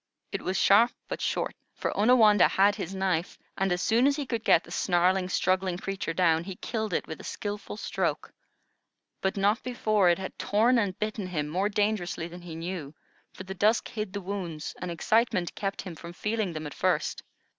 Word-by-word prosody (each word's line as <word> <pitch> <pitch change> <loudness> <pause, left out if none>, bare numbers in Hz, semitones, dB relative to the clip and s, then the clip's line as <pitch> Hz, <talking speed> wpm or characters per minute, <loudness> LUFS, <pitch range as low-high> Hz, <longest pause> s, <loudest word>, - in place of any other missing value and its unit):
It - - -3
was 185 +1 -1
sharp 225 +5 +5 0.2
but - - -5
short; - - -1 0.2
for - - -3
Onawandah 215 -2 +6
had 200 +2 +4
his 195 -1 -5
knife, 185 -3 -1 0.2
and 195 -1 0
as 180 0 0
soon 235 +4 +4
as 285 - +3
he 290 -1 -3
could 230 -3 -3
get 170 - +5
the - - -14
snarling, 180 +1 +2
struggling 185 -1 +1
creature 195 -2 -3
down, 165 -1 +2
he 190 +1 -7
killed 220 +1 -3
it - - -1
with 160 - -7
a - - -13
skilful 205 0 -5
stroke. - - -2 0.9
But 190 +2 -1
not 205 +4 +2
before 215 -6 +2
it 170 - +3
had 190 - -7
torn 230 +4 +3
and 195 -4 -1
bitten 215 -2 -3
him 150 -5 -2
more 185 +7 0
dangerously 205 -5 -1
than 175 +1 -10
he 170 -2 -8
knew; 165 -3 -5 0.4
for - - -9
the 190 0 -6
dusk 215 +4 +2
hid 215 -3 -4
the 200 - -3
wounds, 180 -5 -5
and 180 - -3
excitement 185 +1 +1
kept 195 -1 -3
him 185 -3 -7
from 170 +2 -9
feeling 210 -1 -2
them 155 -1 -5
at 145 - -6
first. - - 0
190 Hz, 200 wpm, -28 LUFS, 175-215 Hz, 0.9 s, Onawandah